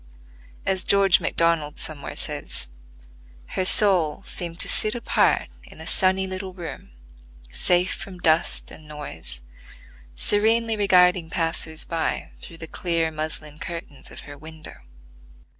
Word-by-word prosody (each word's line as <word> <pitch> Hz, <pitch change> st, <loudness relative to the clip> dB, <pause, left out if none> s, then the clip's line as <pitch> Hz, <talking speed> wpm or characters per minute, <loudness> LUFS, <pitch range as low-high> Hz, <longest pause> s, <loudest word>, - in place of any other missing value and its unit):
As 190 Hz, -1 st, +1 dB
George 195 Hz, -2 st, +5 dB
MacDonald 165 Hz, -3 st, +1 dB
somewhere 155 Hz, -2 st, -2 dB
says, 65 Hz, -, -4 dB, 0.8 s
"Her 185 Hz, -, -1 dB
soul 185 Hz, -4 st, +3 dB
seemed 170 Hz, -2 st, -4 dB
to -, -, -1 dB
sit 215 Hz, +1 st, +2 dB
apart 240 Hz, -, +2 dB
in -, -, -15 dB
a -, -, -7 dB
sunny 190 Hz, 0 st, +2 dB
little 185 Hz, 0 st, -6 dB
room, 170 Hz, -, -7 dB, 0.6 s
safe 175 Hz, -, +3 dB
from 190 Hz, -2 st, -7 dB
dust 165 Hz, -1 st, +2 dB
and 155 Hz, -, -12 dB
noise, 80 Hz, -, -6 dB, 0.7 s
serenely 225 Hz, -, +2 dB
regarding 180 Hz, -4 st, +4 dB
passers 165 Hz, -1 st, +1 dB
by 165 Hz, -1 st, -2 dB
through 165 Hz, -, -11 dB
the 160 Hz, -, -7 dB
clear 165 Hz, -1 st, 0 dB
muslin 155 Hz, -1 st, -5 dB
curtains 165 Hz, -5 st, -6 dB
of -, -, -10 dB
her 145 Hz, -, -10 dB
window." 160 Hz, 0 st, -10 dB
170 Hz, 125 wpm, -24 LUFS, 155-185 Hz, 0.8 s, George